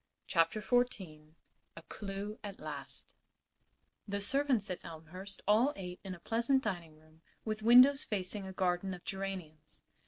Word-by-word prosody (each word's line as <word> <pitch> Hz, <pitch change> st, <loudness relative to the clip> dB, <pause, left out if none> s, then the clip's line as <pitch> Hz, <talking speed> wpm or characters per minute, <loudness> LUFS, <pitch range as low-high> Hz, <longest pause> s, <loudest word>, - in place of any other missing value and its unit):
CHAPTER 165 Hz, +5 st, +2 dB
XVI 190 Hz, -9 st, -1 dB, 0.4 s
A 165 Hz, -, -10 dB
CLEW 200 Hz, +3 st, -6 dB
AT 200 Hz, -2 st, -7 dB
LAST -, -, -7 dB, 0.9 s
The 200 Hz, 0 st, -2 dB
servants 245 Hz, -2 st, +2 dB
at 180 Hz, -, -5 dB
Elmhurst 175 Hz, +5 st, -8 dB
all 230 Hz, +8 st, +4 dB
ate 180 Hz, -1 st, -7 dB
in 190 Hz, -2 st, -5 dB
a -, -, -14 dB
pleasant 235 Hz, +7 st, +1 dB
dining 170 Hz, -7 st, -4 dB
room 155 Hz, +1 st, -23 dB, 0.2 s
with 215 Hz, -1 st, -2 dB
windows 250 Hz, +5 st, +7 dB
facing 195 Hz, -1 st, -3 dB
a -, -, -6 dB
garden 185 Hz, 0 st, 0 dB
of 175 Hz, -, -14 dB
geraniums. 180 Hz, -6 st, -6 dB
195 Hz, 145 wpm, -34 LUFS, 175-215 Hz, 0.9 s, windows